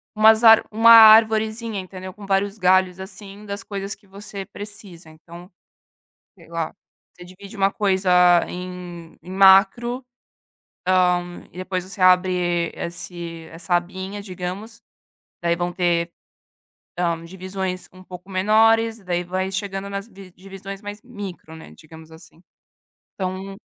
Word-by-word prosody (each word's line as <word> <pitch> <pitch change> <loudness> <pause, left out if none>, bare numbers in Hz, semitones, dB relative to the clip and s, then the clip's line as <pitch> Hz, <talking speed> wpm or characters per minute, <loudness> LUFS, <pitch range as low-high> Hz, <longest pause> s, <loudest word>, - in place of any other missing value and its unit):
umas 220 +1 +5
ár 225 -1 +8
uma 225 +2 +4
arvorezinha, 220 0 +6
entendeu? 185 0 -8
Com 205 +1 -12
vários 195 +1 0
galhos, 185 -1 +2
assim, 200 +1 -11
das 200 -1 -6
coisas 195 -1 -5
que 205 - -18
você 200 0 -8
precisa. 205 -5 -11
Então, 170 +3 -14 0.9
sei 170 -3 -18
lá, 165 -1 -4 0.4
você 180 - -13
divide 195 +3 -13
uma 195 0 +3
coisa 195 -2 0 0.4
em 180 -2 -8
em 180 - -12
macro, 195 +6 +4 0.8
hã, 180 -1 +1
e - - -19
depois 185 0 -4
você 190 +1 -7
abre 180 -2 +2
esse 170 -1 -7
essa 165 +2 -4
abinha, 190 +3 -5
digamos, 200 +4 -7 0.6
daí 170 0 0
vão 175 +1 -3
ter, 175 -1 0 0.9
hã, 170 -2 -1
divisões 185 +1 -6
um 185 0 -15
pouco 180 +1 -12
menores, 225 +4 +3
daí 180 -3 -3
vai 185 +2 -3
chegando 195 0 -4
nas 200 +2 -6
di 195 -2 -14
divisões 195 +1 -10
mais 205 0 -8
micro, 200 -9 -9
né, 160 - -13
digamos 160 - -15
assim. 160 +1 -16 0.7
Então, 190 +1 -5
190 Hz, 135 wpm, -22 LUFS, 175-200 Hz, 0.9 s, ár